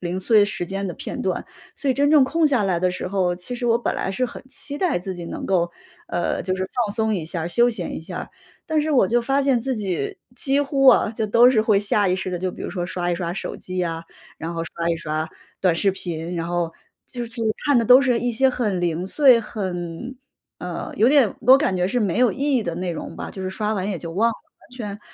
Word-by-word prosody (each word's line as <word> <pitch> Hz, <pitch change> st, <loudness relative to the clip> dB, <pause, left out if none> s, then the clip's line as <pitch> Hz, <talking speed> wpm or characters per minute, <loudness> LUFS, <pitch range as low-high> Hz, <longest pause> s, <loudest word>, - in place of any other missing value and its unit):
零 180 Hz, +1 st, -3 dB
碎 210 Hz, +2 st, +4 dB
时 175 Hz, -4 st, -2 dB
间 195 Hz, +1 st, -3 dB
的 -, -, -4 dB
片 -, -, -6 dB
段。 -, -, -1 dB, 0.3 s
所 280 Hz, -, -3 dB
以 -, -, +1 dB
真 285 Hz, +1 st, +2 dB
正 295 Hz, -4 st, +6 dB
空 325 Hz, +4 st, +1 dB
下 260 Hz, -7 st, +2 dB
来 180 Hz, -3 st, +1 dB
的 185 Hz, 0 st, +2 dB
时 180 Hz, -, -4 dB
候， 180 Hz, -2 st, 0 dB
其 185 Hz, +8 st, -5 dB
实 240 Hz, 0 st, -3 dB
我 230 Hz, 0 st, +3 dB
本 -, -, -2 dB
来 -, -, -2 dB
是 255 Hz, +6 st, -1 dB
很 -, -, -10 dB
期 285 Hz, +1 st, -5 dB
待 345 Hz, -, +1 dB
自 185 Hz, +1 st, -5 dB
己 175 Hz, -1 st, -7 dB
能 -, -, -6 dB
够， 175 Hz, -3 st, +1 dB, 0.4 s
呃， 175 Hz, -, -1 dB
就 185 Hz, +1 st, -1 dB
是 190 Hz, 0 st, -3 dB, 0.2 s
放 205 Hz, -, -4 dB
松 220 Hz, -1 st, +1 dB
一 175 Hz, -5 st, -3 dB
下、 165 Hz, 0 st, -3 dB
休 240 Hz, +6 st, +4 dB
闲 195 Hz, -7 st, -4 dB
一 -, -, -6 dB
下。 160 Hz, -, -7 dB, 0.4 s
但 315 Hz, -1 st, +1 dB
是 310 Hz, +1 st, -1 dB
我 245 Hz, -8 st, +5 dB
就 240 Hz, +1 st, +3 dB
发 270 Hz, +3 st, +1 dB
现 265 Hz, -4 st, +2 dB
自 260 Hz, +1 st, -2 dB
己， 180 Hz, -9 st, -3 dB, 0.2 s
几 275 Hz, +3 st, +1 dB
乎 275 Hz, -1 st, +1 dB
啊 230 Hz, -, +6 dB
就 220 Hz, -1 st, -2 dB
都 235 Hz, +4 st, +6 dB
是 225 Hz, -4 st, +3 dB
会 215 Hz, -2 st, +3 dB
下 205 Hz, 0 st, +2 dB
意 180 Hz, -, +2 dB
识 185 Hz, -, -3 dB
地， 180 Hz, -, -3 dB
就 185 Hz, +1 st, -2 dB
比 -, -, -9 dB
如 -, -, -4 dB
说 175 Hz, -2 st, -3 dB
刷 175 Hz, -1 st, -2 dB
一 -, -, +1 dB
刷 170 Hz, -1 st, -3 dB
手 -, -, -5 dB
机 185 Hz, -1 st, -3 dB
啊， 165 Hz, 0 st, -3 dB, 0.4 s
然 165 Hz, +2 st, -5 dB
后 165 Hz, -, -2 dB
刷 170 Hz, 0 st, -3 dB
一 165 Hz, -, +1 dB
刷 155 Hz, 0 st, -3 dB, 0.3 s
短 180 Hz, -3 st, +3 dB
视 195 Hz, +3 st, +3 dB
频。 175 Hz, -2 st, -4 dB
然 165 Hz, 0 st, -2 dB
后 175 Hz, -1 st, -1 dB, 0.3 s
就 240 Hz, -1 st, -5 dB
是 230 Hz, -, -13 dB, 0.3 s
看 285 Hz, -3 st, +4 dB
的 230 Hz, -, +2 dB
都 250 Hz, +3 st, +8 dB
是 250 Hz, -4 st, +2 dB
一 245 Hz, -, 0 dB
些 265 Hz, +4 st, +4 dB
很 215 Hz, -8 st, -1 dB
零 175 Hz, 0 st, -1 dB
碎， 260 Hz, +1 st, +5 dB
很 190 Hz, +3 st, -5 dB, 0.4 s
呃， 180 Hz, -1 st, -5 dB
有 220 Hz, -, +4 dB
点 275 Hz, -5 st, +5 dB
我 -, -, -13 dB
都 265 Hz, +1 st, +9 dB
感 190 Hz, -11 st, 0 dB
觉 180 Hz, 0 st, +1 dB
是 245 Hz, -, 0 dB
没 200 Hz, -4 st, 0 dB
有 250 Hz, -1 st, +5 dB
意 -, -, -10 dB, 0.2 s
义 230 Hz, -, +1 dB
的 170 Hz, -3 st, -3 dB
内 180 Hz, 0 st, -2 dB
容 -, -, -7 dB
吧， -, -, -6 dB
就 190 Hz, -, -7 dB
是 185 Hz, -, -3 dB
刷 210 Hz, +2 st, -2 dB
完 195 Hz, 0 st, -2 dB
也 180 Hz, -, -3 dB
就 165 Hz, -1 st, -7 dB
忘 220 Hz, +6 st, +3 dB
了， -, -, -5 dB, 0.3 s
完 -, -, -22 dB
全， 210 Hz, -5 st, -6 dB
200 Hz, 280 characters per minute, -22 LUFS, 175-245 Hz, 0.4 s, 都